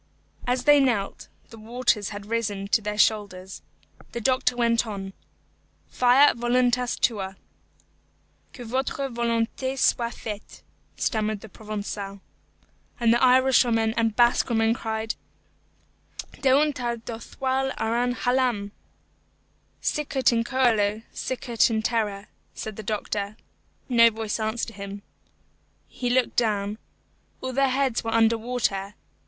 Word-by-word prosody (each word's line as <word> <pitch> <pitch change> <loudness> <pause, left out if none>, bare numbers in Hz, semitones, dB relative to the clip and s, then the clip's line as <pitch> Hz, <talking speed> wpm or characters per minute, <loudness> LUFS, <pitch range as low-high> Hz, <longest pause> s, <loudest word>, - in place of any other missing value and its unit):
As 250 0 +1
they 290 0 +6
knelt, 235 -8 0 0.2
the 225 - -11
waters 230 -2 0
had 205 -1 -7
risen 205 -3 -2
to 220 - +3
their 210 0 -4
shoulders. 200 -3 0 0.5
The 235 - -3
doctor 255 +1 +2
went 235 -1 +2
on, 195 -2 -6 0.8
"Fiat 250 +1 +5
voluntas 245 +1 +1
tua." 195 -5 0 1.2
"Que 245 - -10
votre 265 +3 -2
volonté 235 +2 -1
soit 235 -2 +1
faite," 210 -2 -8 0.3
stammered 215 -2 -1
the 220 - -11
Provençal. 205 -2 -6 0.8
And 230 -1 +4
the 240 - +2
Irishwoman 250 -3 +4
and 225 -2 +1
Basque 240 +1 +3
woman 225 -1 +2
cried, 220 -1 -3 1.3
"Deuntar 265 -3 +2
do 225 0 -7
thoil 265 +2 -2
ar 230 +2 0
an 245 0 0
Hhalàmb." 245 -6 0 1.1
"Sicut 275 -4 +1
in 230 0 +2
coelo, 225 -4 +1
sicut 245 -3 0
in 220 -1 -1
terra," 210 -3 -1 0.3
said 220 -1 -6
the 220 - -6
doctor. 210 0 -3 0.5
No 230 -2 +6
voice 220 -1 -4
answered 220 0 -3
him. 200 0 -7 0.8
He 245 - -3
looked 250 0 +1
down. 210 -2 0 0.6
All 260 0 -4
their 275 +1 +3
heads 260 -2 0
were 225 - -3
under 225 0 +4
water. 210 -4 -2
230 Hz, 125 wpm, -25 LUFS, 215-250 Hz, 1.3 s, they